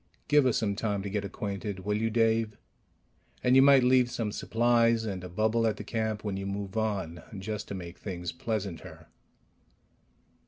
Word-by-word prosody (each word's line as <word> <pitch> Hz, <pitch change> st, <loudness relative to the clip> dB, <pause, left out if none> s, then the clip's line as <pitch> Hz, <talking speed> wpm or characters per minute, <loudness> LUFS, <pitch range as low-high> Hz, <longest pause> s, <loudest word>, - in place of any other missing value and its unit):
"Give 145 Hz, -2 st, +5 dB
us 125 Hz, -, +2 dB
some 100 Hz, -3 st, 0 dB
time 100 Hz, -2 st, -2 dB
to 100 Hz, -, -5 dB
get 105 Hz, 0 st, -1 dB
acquainted, 100 Hz, 0 st, -4 dB
will 105 Hz, +2 st, -1 dB
you, 110 Hz, +1 st, 0 dB
Dave? 115 Hz, -1 st, +1 dB, 0.9 s
And 125 Hz, +1 st, +4 dB
you 135 Hz, -, +8 dB
might 135 Hz, -1 st, +7 dB
leave 125 Hz, -1 st, +4 dB
some 115 Hz, -3 st, -2 dB
supplies 115 Hz, +1 st, +2 dB
and 95 Hz, -4 st, -4 dB
a 90 Hz, -, -7 dB
bubble 110 Hz, +5 st, +1 dB
at 110 Hz, -, -1 dB
the -, -, -6 dB
camp 110 Hz, -2 st, -2 dB
when 100 Hz, -2 st, -2 dB
you 100 Hz, 0 st, -4 dB
move 100 Hz, 0 st, -4 dB
on, 100 Hz, -7 st, -2 dB, 0.2 s
just 105 Hz, +2 st, -5 dB
to 100 Hz, -, -5 dB
make 90 Hz, -1 st, -8 dB
things 90 Hz, -4 st, -5 dB
pleasanter." 100 Hz, -1 st, -5 dB
105 Hz, 180 wpm, -29 LUFS, 100-115 Hz, 0.9 s, you